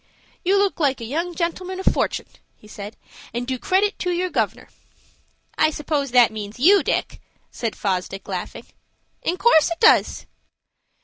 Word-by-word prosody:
"You 385 +3 +3
look 395 -2 +1
like 275 -4 +1
a 230 - -6
young 335 +8 -3
gentleman 365 +2 -3
of 380 - -6
fortun'," - - +1 0.3
he 210 - -19
said, 210 0 -9 0.4
"and 240 +1 -2
do 255 0 -3
credit 400 - +1
to 360 - -2
your 360 +1 -1
governor." - - -2 0.9
"I - - +5
suppose 295 -2 -2
that 245 -2 +5
means 215 0 -7
you, 380 +10 +6
Dick," - - -2 0.3
said 230 -3 -4
Fosdick, 195 0 -3
laughing. 185 -3 -5 0.6
"In 355 - -1
course 365 -8 +4
it 335 - -4
does." 440 -1 +4
305 Hz, 160 wpm, -22 LUFS, 230-370 Hz, 0.9 s, you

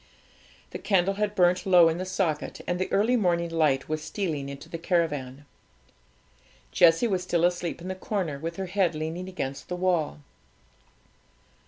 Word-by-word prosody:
The - - -6
candle 195 -1 +2
had 210 +1 -2
burnt 180 -1 +3
low 180 -3 +6
in 165 +1 0
the 185 - -4
socket, 175 -5 -2
and 180 0 -2
the 185 - -2
early 220 +5 +3
morning 170 -6 +1
light 150 -5 +1
was 155 0 -2
stealing 155 -10 -3
into 140 0 -9
the 165 - -6
caravan. 145 -6 -1 1.3
Jessie 165 +6 +5
was 190 -4 0
still 175 -2 +1
asleep 175 -1 -1
in 180 - -7
the 190 - -2
corner, 185 -6 -3
with 165 +3 -5
her 190 - -4
head 185 -3 0
leaning 160 +4 -4
against 135 -7 -5
the 180 - -2
wall. 175 -5 0
175 Hz, 165 wpm, -26 LUFS, 160-185 Hz, 1.3 s, low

